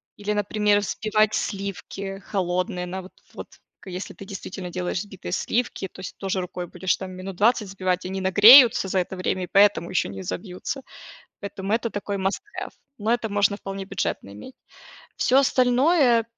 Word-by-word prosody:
Или, 205 0 -4
например, 210 0 +2
взбивать 215 +1 +1
сливки 195 0 -4
холодные 180 -2 -1
на 185 +2 -5
вот 185 - -13 0.2
вот - - -8 0.3
к - - -17
если 180 +2 -6
ты 195 - -10
действительно 190 -1 -7
делаешь 180 0 -2
взбитые 195 -4 -8
сливки, 220 +1 -1
то 185 - -16
есть 185 - -8
тоже 190 -1 -2
рукой 180 0 -5
будешь 180 +2 -1
там 190 -1 -7
минут 185 +1 -7
20 215 +1 +2
сбивать, 185 -2 -1
они 190 +1 -4
нагреются 215 +4 +8
за 190 - -1
это 180 +1 -3
время 185 0 -2
и - - -5
поэтому 200 -4 +4
ещё 180 - 0
не 95 -1 -7
собьются. 180 - -5 0.6
Поэтому 200 0 -5
это 230 +1 0
такой 205 0 -3
маст 195 +1 -1
хэв. - - -5 0.3
Но 215 +1 -1
это 235 -2 -2
можно 200 0 +2
вполне 195 -1 -6
бюджетно 100 - -3
иметь. 105 - -11 0.6
Всё 260 - +3
остальное, 255 -1 +4
195 Hz, 170 wpm, -24 LUFS, 185-210 Hz, 0.6 s, нагреются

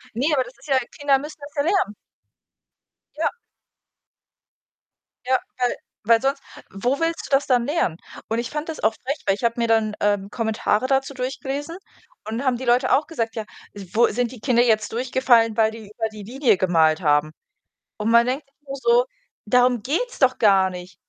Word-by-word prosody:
Ne, 285 +6 +1
aber 265 -3 +2
das 245 +1 -13
ist 275 - -16
ja 270 -2 +3 0.2
Kinder 280 -2 +3
müssen 300 +2 -9
das 285 0 -10
ja 285 - +1
lernen. 350 - +1 1.2
Ja. - - +1 2.0
Ja, 260 0 +3 0.2
weil 250 -1 0 0.3
weil 225 +1 +4
sonst 275 +1 0 0.3
wo 245 - -1
willst 330 0 -1
du - - -16
das 275 - +1
dann 245 -3 +2
lernen? 290 - 0 0.3
Und 225 +1 0
ich 235 +1 -3
fand 300 +2 -4
das 320 - -5
auch 220 0 +2
frech, 280 +4 -2
weil 195 - +3
ich 205 - -12
habe 235 0 +2
mir 235 -1 +1
dann, 220 -2 +2
ähm, 205 -1 0
Kommentare 220 +1 0
dazu 270 +1 0
durchgelesen 275 +4 -4 0.5
und 220 +1 -3
dann 275 - -4
haben 255 -2 +2
die 255 - -7
Leute 250 +2 +3
auch 295 - +3
gesagt, 230 -9 -3
ja, 220 - -3 0.5
wo 235 +2 +5
„Sind 245 +1 -1
die 255 - -11
Kinder 240 0 +3
jetzt 220 -3 +1
durchgefallen, 240 -2 +2
weil 220 -1 +3
die 220 -2 -11
über 220 0 -2
die 215 -1 -10
Linie 240 -1 +1
gemalt 165 -3 +3
haben?“ 150 -1 +2 0.7
Und 215 +1 -1
man 235 +1 +5
denkt 270 +3 -2
sich 275 - -39
nur 275 0 -5
so: 470 - +3 0.4
„Darum 245 +1 +3
geht's 480 - -2
doch 260 -2 +3
gar 195 -3 +4
nicht.“ 180 0 -9
245 Hz, 195 wpm, -22 LUFS, 220-275 Hz, 2.0 s, wo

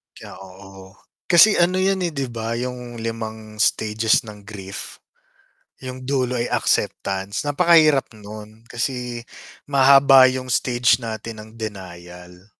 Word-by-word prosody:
Kaya, - - -12
oo. 95 0 -14 0.3
Kasi 185 +5 +6
ano 180 +2 +2
'yun, 195 +1 +1
eh, 170 - -3
'di 135 -3 -3
ba, 115 -1 -4
'yung 120 -1 -6
limang 110 -1 -6
stages 110 +1 +1
ng 105 -2 -13
grief. 95 -2 -9 0.8
'Yung 130 0 -8
dulo 130 -2 -1
ay 120 - -1
acceptance, 95 +1 -1
napakahirap 155 -3 +3
nun 110 +1 -12
kasi 120 -1 -4 0.4
mahaba 135 -1 +6
'yung 130 0 -5
stage 120 0 +2
natin 110 -1 -7
ng 110 - -13
denial. 90 -4 -10
115 Hz, 125 wpm, -21 LUFS, 105-130 Hz, 0.8 s, Kasi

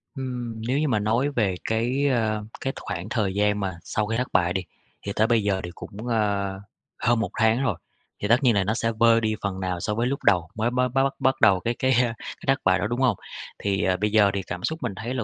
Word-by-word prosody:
Ừm, 125 -4 -5
nếu 130 +3 +1
như 155 - +1
mà 110 -5 +1
nói 115 +7 +1
về 105 -9 0
cái, 120 +6 0
ơ, 110 -5 0 0.2
cái 135 - -2
khoảng 90 +4 -5
thời 105 -6 0
gian 105 +1 +1
mà 95 -4 -3
sau 105 0 -2
khi 115 +1 -1
thất 125 +1 -1
bại 90 -1 +3
đi, 95 - 0 0.4
thì 100 - -4
tới 110 - +3
bây 115 -3 +2
giờ 95 -2 0
thì 90 - -5
cũng, 110 +4 -8
ơ, 100 -4 0 0.4
hơn 120 -1 +2
1 115 - -1
tháng 110 +3 +3
rồi. 120 -9 0 0.4
Thì 105 - -2
tất 120 +5 +3
nhiên 120 -4 +4
là 100 - +3
nó 105 +3 0
sẽ 115 0 0
vơi 115 0 +5
đi 110 -1 0
phần 95 -2 -3
nào 90 -2 -2
so 105 +4 -2
với 120 +2 0
lúc 140 +2 -3
đầu 90 -4 +3
mới 110 +2 +1
bắt 125 +1 +2
bắt 135 +2 +1
bắt 135 - 0
bắt 130 - +1
đầu 100 -4 +6
cái 120 +5 -1
cái, 130 - +2
ơ, 125 - +4 0.2
cái - - -10
thất 135 +1 +3
bại 95 0 +3
đó, 100 - 0
đúng 120 +2 -2
hông? 125 -5 +3 0.4
Thì, 100 -1 0
ờ, 95 -1 +2
bây 105 +2 0
giờ 105 -2 +5
thì 100 - -1
cảm 90 0 -5
xúc 160 0 -2
mình 115 -5 -2
thấy 115 +5 -4
là 125 -3 -2
110 Hz, 270 wpm, -25 LUFS, 100-125 Hz, 0.4 s, đầu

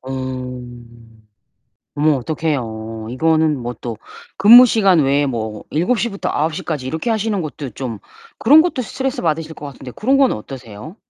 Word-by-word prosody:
어. 125 -2 -6 1.1
어머 150 0 +3
어떡해요. 115 -7 -4
이거는 155 +1 +1
뭐 120 0 -4
또 115 -3 -6 0.4
근무 240 +5 +9
시간 195 -7 +3
외에 140 +1 +2
뭐 110 -4 -4
7:00 230 +9 0
부터 195 -2 -5
9:00 160 +5 -1
까지 145 -6 -4
이렇게 160 - -3
하시는 220 -2 -1
것도 145 -3 -6
좀 115 -2 -6 0.4
그런 295 +7 +7
것도 315 -7 -1
스트레스 265 +2 -3
받으실 160 -1 -1
것 150 - -10
같은데 130 -2 -10
그런 265 - +1
건 270 -2 +4
어떠세요? 120 - -8
150 Hz, 290 characters per minute, -18 LUFS, 125-195 Hz, 1.1 s, 근무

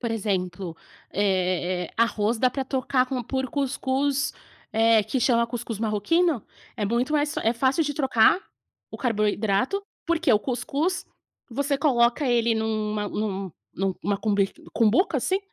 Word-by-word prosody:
por 235 -2 -2
exemplo, 185 -5 -2 0.4
eh, 185 -2 0
arroz 225 -1 +1
dá 255 +1 +3
para 270 +1 -3
trocar 260 -1 +1
com 255 -2 -3
por 265 +2 -2
cuscuz, 275 0 0 0.4
eh, 225 -1 +4
que 265 - -1
chama 235 -2 +3
cuscuz 230 -2 -5
marroquino, 230 - +1 0.3
é 215 - -1
muito 240 +7 0
mais 295 +1 +1
é 225 - +2
fácil 265 +6 +2
de 290 -2 -2
trocar 265 +2 +4 0.5
o - - -7
carboidrato 215 - 0 0.2
porque 335 -4 +1
o 210 - +5
cuscuz 280 - -2 0.4
você 280 +3 -1
coloca 250 -1 +3
ele 235 -1 +3
numa 215 -2 -1
num 195 -3 -3 0.2
numa 195 +1 -1
cober 200 -2 +1
numa - - -16
cumbuca, 230 - +3
assim, 380 +1 0
235 Hz, 145 wpm, -25 LUFS, 210-270 Hz, 0.5 s, o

